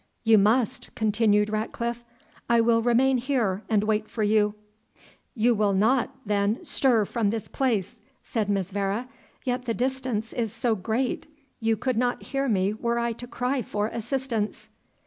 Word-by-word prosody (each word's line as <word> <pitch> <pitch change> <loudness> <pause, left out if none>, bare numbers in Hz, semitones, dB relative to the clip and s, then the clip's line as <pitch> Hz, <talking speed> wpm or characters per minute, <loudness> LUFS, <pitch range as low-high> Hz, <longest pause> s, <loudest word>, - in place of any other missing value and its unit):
"You 225 -2 +6
must," 220 +3 +2
continued 210 -1 +2
Ratcliffe; 235 +2 -3 0.5
"I 235 0 +5
will 230 0 +4
remain 250 +2 +3
here 235 -7 0
and 210 -2 +3
wait 215 0 0
for 220 - -2
you." 210 0 +2 0.8
"You 240 +1 +3
will 205 -2 +2
not, 225 +6 +3 0.2
then, 205 +1 0
stir 235 -6 +3
from 220 -1 0
this 220 -1 -3
place," 240 -4 -1 0.2
said 215 -3 -2
Miss 195 -2 0
Vere 200 +4 -1 0.4
"yet 250 -1 -2
the 230 -2 -1
distance 255 -3 -2
is 230 -4 -1
so 230 +1 0
great, 220 +9 -2 0.3
you 225 -1 +1
could 255 +1 -1
not 245 +1 0
hear 275 -1 -1
me 195 -1 +2
were 235 +2 -1
I 235 0 0
to 245 +2 -9
cry 255 +2 -1
for 210 -1 -2
assistance." 235 -2 -3
225 Hz, 160 wpm, -26 LUFS, 210-245 Hz, 0.8 s, You